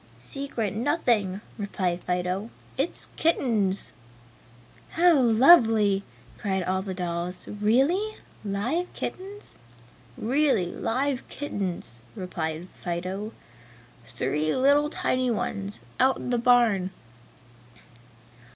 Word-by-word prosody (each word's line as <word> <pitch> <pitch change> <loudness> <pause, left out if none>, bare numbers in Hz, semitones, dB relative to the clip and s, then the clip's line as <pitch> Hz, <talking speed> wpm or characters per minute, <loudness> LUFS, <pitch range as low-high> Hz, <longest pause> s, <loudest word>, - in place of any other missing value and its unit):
"Secret 275 -8 -2
nothing," 220 - +1 0.2
replied 185 -3 -2
Fido, 180 +4 -1 0.3
"It's 275 +6 -2
kittens!" 225 - +1 1.0
"How 345 +1 +5
lovely!" 225 - +6 0.4
cried 190 -2 -1
all 190 +1 0
the 190 -1 -5
dolls, 175 0 -3
"Really 270 - +1 0.3
live 235 - -1
kittens?" 400 +2 -7 0.6
"Really 265 -4 +2
live 260 +9 -2
kittens!" 185 - -4 0.2
replied 170 -2 -4
Fido, 185 +4 -4 0.8
"Three 145 +7 -1
little 285 +3 +4
tiny 255 -4 0
ones, 205 -2 -3 0.2
out 260 0 +4
in - - -4
the 245 - +2
barn!" 230 -6 +4
215 Hz, 90 wpm, -26 LUFS, 185-265 Hz, 1.0 s, lovely